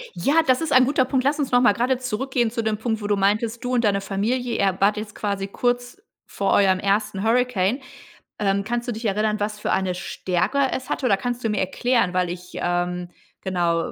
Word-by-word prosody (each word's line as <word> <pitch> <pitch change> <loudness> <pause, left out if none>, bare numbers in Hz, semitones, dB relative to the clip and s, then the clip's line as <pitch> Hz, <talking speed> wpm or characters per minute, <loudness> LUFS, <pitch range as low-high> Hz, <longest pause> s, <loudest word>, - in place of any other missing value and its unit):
Ja, 310 +4 +3
das 255 +3 +3
ist 325 - -2
ein 255 0 +6
guter 265 -2 +2
Punkt. 260 -1 0
Lass 290 +2 +1
uns 275 - -1
noch 245 0 +5
mal 210 -5 +5
grade 250 +2 +1
zurückgehen 250 -1 -1
zu 230 -2 -2
dem 215 -1 0
Punkt, 220 -1 -2
wo 205 - -3
du 205 - +2
meintest, 215 +5 0
du 250 +1 -2
und 240 -1 +2
deine 200 -2 +2
Familie, 230 +5 -1
ihr 195 -1 +1
wart 205 +2 +3
jetzt 210 -1 -6
quasi 200 -2 -2
kurz 245 - -2 0.2
vor 195 - -2
eurem 190 -2 +4
ersten 200 0 0
Hurricane. 240 -1 +1 0.6
Ähm, 200 -1 +1
kannst 240 +3 -3
du - - -1
dich 225 +1 -6
erinnern, 210 +1 0
was 210 0 -3
für - - -2
eine 190 -1 0
Stärke 185 +8 -1
es 260 - -4
hatte, 265 - -2
oder 200 -5 +3
kannst 245 +1 -4
du 225 - 0
mir 210 - -1
erklären, 200 0 +1
weil 180 -1 +1
ich, 180 0 -8
ähm, 175 0 -2 0.3
genau 170 -3 0
215 Hz, 220 wpm, -23 LUFS, 195-245 Hz, 0.6 s, ein